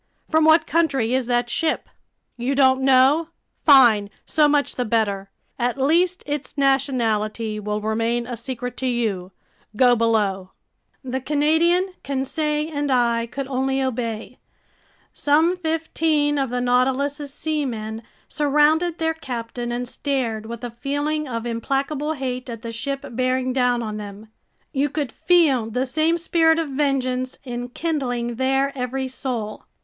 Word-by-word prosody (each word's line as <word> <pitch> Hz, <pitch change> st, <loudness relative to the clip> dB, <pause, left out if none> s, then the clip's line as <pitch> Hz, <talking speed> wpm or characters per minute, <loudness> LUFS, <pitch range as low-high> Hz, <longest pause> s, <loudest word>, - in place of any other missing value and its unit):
"From 315 Hz, 0 st, +4 dB
what 315 Hz, +1 st, +6 dB
country 275 Hz, -8 st, +1 dB
is 260 Hz, -2 st, 0 dB
that 240 Hz, 0 st, +1 dB
ship?" 315 Hz, +6 st, -1 dB, 0.5 s
"You 245 Hz, +3 st, -1 dB
don't 265 Hz, -1 st, +4 dB
know? 270 Hz, +5 st, +4 dB, 0.3 s
Fine, 240 Hz, -8 st, +6 dB, 0.2 s
so 305 Hz, -2 st, +3 dB
much 290 Hz, -1 st, +1 dB
the 250 Hz, -, -1 dB
better! 210 Hz, -4 st, 0 dB, 0.3 s
At 245 Hz, +1 st, 0 dB
least 340 Hz, +6 st, +2 dB
its 290 Hz, -2 st, -5 dB
nationality 230 Hz, -6 st, 0 dB
will 210 Hz, 0 st, -3 dB
remain 230 Hz, +2 st, 0 dB
a 245 Hz, 0 st, -5 dB
secret 245 Hz, +1 st, -5 dB
to 260 Hz, -, -2 dB
you. 215 Hz, -7 st, -1 dB, 0.4 s
Go 245 Hz, +1 st, +5 dB
below!" 205 Hz, -5 st, 0 dB, 0.5 s
The 260 Hz, 0 st, -3 dB
Canadian, 320 Hz, +6 st, +2 dB
Conseil, 300 Hz, +3 st, -1 dB
and 290 Hz, 0 st, -1 dB
I 235 Hz, -2 st, +2 dB
could 275 Hz, +3 st, -5 dB
only 265 Hz, 0 st, 0 dB
obey. 240 Hz, -2 st, -3 dB, 0.7 s
Some 315 Hz, +5 st, +3 dB
fifteen 315 Hz, -3 st, 0 dB
of 270 Hz, -2 st, 0 dB
the 245 Hz, +1 st, -2 dB
Nautilus's 265 Hz, +4 st, +1 dB
seamen 245 Hz, -8 st, -3 dB, 0.3 s
surrounded 300 Hz, +4 st, +2 dB
their 320 Hz, 0 st, 0 dB
captain 240 Hz, -5 st, -5 dB
and 245 Hz, +1 st, -3 dB
stared 235 Hz, -6 st, -2 dB
with 235 Hz, +1 st, -7 dB
a 240 Hz, -, -4 dB
feeling 290 Hz, +5 st, -2 dB
of 230 Hz, -2 st, -4 dB
implacable 275 Hz, +6 st, -1 dB
hate 255 Hz, -3 st, -4 dB
at 230 Hz, -1 st, -7 dB
the 230 Hz, -, -5 dB
ship 275 Hz, +4 st, -4 dB
bearing 255 Hz, +1 st, 0 dB
down 250 Hz, -2 st, +1 dB
on 215 Hz, -1 st, -4 dB
them. 205 Hz, +1 st, -9 dB, 0.4 s
You 285 Hz, +1 st, +1 dB
could 285 Hz, -3 st, -3 dB
feel 290 Hz, -11 st, +3 dB
the 250 Hz, +4 st, -1 dB
same 315 Hz, +5 st, +1 dB
spirit 325 Hz, -1 st, +3 dB
of 325 Hz, -3 st, -1 dB
vengeance 260 Hz, -2 st, -1 dB
enkindling 245 Hz, -1 st, -3 dB
their 270 Hz, +2 st, +1 dB
every 260 Hz, +1 st, -2 dB
soul. 245 Hz, -5 st, -4 dB
260 Hz, 140 wpm, -22 LUFS, 235-295 Hz, 0.7 s, what